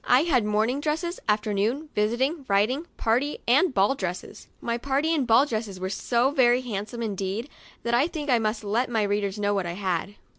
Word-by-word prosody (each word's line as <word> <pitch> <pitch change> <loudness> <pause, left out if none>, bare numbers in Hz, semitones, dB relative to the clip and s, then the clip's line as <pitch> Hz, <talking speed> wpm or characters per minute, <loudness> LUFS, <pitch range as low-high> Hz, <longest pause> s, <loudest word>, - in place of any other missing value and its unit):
I 250 +2 +4
had 260 -10 +2
morning 220 +6 +1
dresses, 320 +4 -2
afternoon, 215 +8 0
visiting, 260 +9 0
riding, 220 +11 +1
party 250 +6 0
and 285 +8 +4
ball 200 +1 +3
dresses. 185 -8 -6
My 235 0 -2
party 280 +5 0
and 280 -6 0
ball 235 +4 +6
dresses 215 -7 -4
were 185 +1 -3
so 240 +5 +1
very 250 -3 +4
handsome 230 0 -5
indeed, 205 +4 -3 0.3
that 235 - -1
I 255 +6 +4
think 310 -4 -5
I 250 -4 +3
must 215 0 -1
let 225 +5 0
my 225 -3 +1
readers 205 0 -1
know 205 0 0
what 195 -3 -1
I 170 - -3
had. 190 +1 -2
235 Hz, 190 wpm, -26 LUFS, 205-270 Hz, 0.3 s, ball